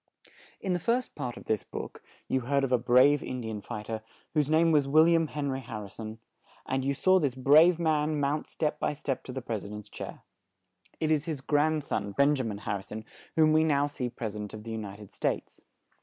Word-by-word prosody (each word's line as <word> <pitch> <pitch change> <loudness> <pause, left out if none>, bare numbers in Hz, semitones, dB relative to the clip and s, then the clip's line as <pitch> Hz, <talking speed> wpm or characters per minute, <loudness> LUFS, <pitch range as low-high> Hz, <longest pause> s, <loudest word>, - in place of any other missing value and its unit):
In 190 - -1
the 175 - 0
first 240 +7 0
part 125 -5 -5
of - - -11
this 110 -2 0
book, - - -7 0.3
you 130 - +1
heard 140 +3 +1
of 135 - 0
a 125 - +4
brave 130 +4 +5
In 130 - -4
di 110 -1 -4
an 105 -1 -5
fight 105 +1 -7
er, 110 -1 -3 0.3
whose 150 -2 +2
name 165 +1 +4
was 145 -3 +3
Wil 155 +3 +6
liam 165 -2 +3
Hen 145 -2 -2
ry 130 - -2
Har 115 -4 -6
ri 100 - -9
son; 110 0 -7 0.5
and 130 0 -1
you 140 +1 0
saw 185 +7 +4
this 140 -6 0
brave 155 +6 +6
man 155 -2 +1
mount 145 +2 0
step 150 -1 -2
by - - 0
step 135 -3 -3
to - - -6
the 130 -1 -5
pres 110 -4 -3
i - - -7
dent's 105 0 -8
chair. - - -8 0.8
It 155 -1 +1
is 150 -1 +2
his 155 -4 -3
grand 150 +2 +2
son, 100 -6 -3
Ben 140 +6 +4
ja 130 - -1
min 110 -3 -3
Har 100 0 -2
ri - - -8
son, 110 +2 -8 0.3
whom 155 -1 +5
we 155 0 +5
now 145 -3 +3
see 145 -4 -3
pres 115 -3 -5
i - - -5
dent 105 0 -6
of 105 - -9
the 115 - -6
U 110 - -3
ni 100 -2 -6
ted 105 -2 -12
States. - - -3
135 Hz, 250 wpm, -29 LUFS, 110-155 Hz, 0.8 s, Wil